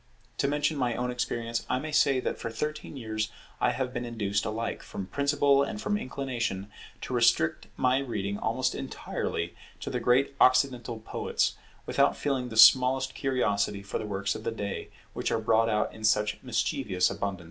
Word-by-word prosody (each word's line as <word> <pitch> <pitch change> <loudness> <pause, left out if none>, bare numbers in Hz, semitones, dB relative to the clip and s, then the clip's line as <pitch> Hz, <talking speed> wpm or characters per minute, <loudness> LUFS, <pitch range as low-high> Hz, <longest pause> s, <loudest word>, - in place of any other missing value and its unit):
To - - +2
mention 150 +2 0
my 125 -3 0
own 125 0 -1
experience, 120 -1 -2
I 125 - +2
may 155 +4 -4
say 140 -2 +4
that - - -3
for 115 - -4
thirteen 150 +4 -4
years 110 -3 -2 0.3
I - - +3
have 130 -1 -3
been 120 - -3
induced 105 -4 -1
alike 115 +1 -3
from 95 - -6
principle 140 +3 +3
and 140 +9 -2
from 210 -1 0
inclination, 120 - -3 0.3
to - - -5
restrict 115 -10 +2
my 130 +1 +3
reading 100 -6 -3
almost - - 0
entirely 85 +1 -4 0.3
to - - -5
the - - -1
great 130 +3 +3
Occidental 130 -2 +3
poets, - - -1 0.3
without - - +2
feeling 130 -4 -1
the 110 - -6
smallest 130 +3 +7
curiosity 105 -6 0
for 100 - -3
the 110 - -5
works 100 0 -1
of 110 - -7
the - - -1
day 105 -3 -4 0.2
which - - -2
are - - +2
brought 115 +1 +2
out 105 -1 0
in 110 - -11
such 105 0 +2
mischievous 115 - 0
abundance. 100 -2 -3
120 Hz, 180 wpm, -28 LUFS, 105-130 Hz, 0.3 s, smallest